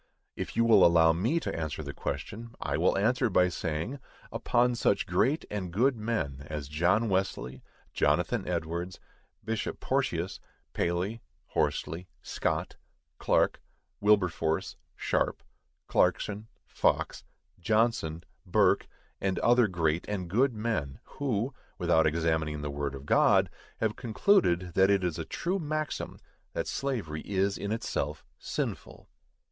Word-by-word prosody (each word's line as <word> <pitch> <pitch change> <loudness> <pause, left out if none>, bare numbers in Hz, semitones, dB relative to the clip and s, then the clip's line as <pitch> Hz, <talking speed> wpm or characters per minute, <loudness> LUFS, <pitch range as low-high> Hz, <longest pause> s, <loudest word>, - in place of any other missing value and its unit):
If - - -5
you 115 +1 +3
will 110 -5 +7
allow 85 -1 +6
me 115 - +1
to - - -3
answer 80 -1 -3
the 70 0 -6
question, 115 +9 -5
I 70 - -2
will 85 +6 +2
answer 120 +4 +2
by 90 -2 +4
saying, 85 - -3 0.3
Upon 125 0 +2
such 110 -4 +1
great 130 - +1
and 95 -4 -3
good 125 +9 +3
men 105 -12 -2
as 75 -2 -4
John 90 +10 +2
Wesley, 95 - -1 0.3
Jonathan - - +1
Edwards, 85 +1 -3 0.5
Bishop 110 0 -2
Porteus, - - -1 0.3
Paley, 90 +6 -1 0.3
Horsley, 85 +3 -1 0.2
Scott, - - -2 0.4
Clark, - - +2 0.4
Wilberforce, 90 -6 +2 0.2
Sharpe, - - -1 0.4
Clarkson, 105 +1 +1 0.2
Fox, - - 0 0.4
Johnson, 100 -5 +1 0.2
Burke, - - +3 0.3
and 95 -1 0
other 120 -1 +4
great 85 -2 0
and 95 -4 -2
good 125 +4 +3
men, 105 -12 -2
who, 130 -2 -2 0.2
without 85 -3 +3
examining 80 -2 0
the 75 - -3
word 70 -1 -3
of 70 0 -9
God, - - +4 0.3
have 110 -1 0
concluded 110 - +2
that 95 +2 +4
it 100 -2 +3
is 90 -3 -1
a - - -3
true 185 +3 -2
maxim 155 -1 -3 0.4
that - - -2
slavery 110 - -3
is 100 0 0
in 100 - -4
itself 75 -9 -2
sinful. - - -4
95 Hz, 130 wpm, -29 LUFS, 80-115 Hz, 0.5 s, will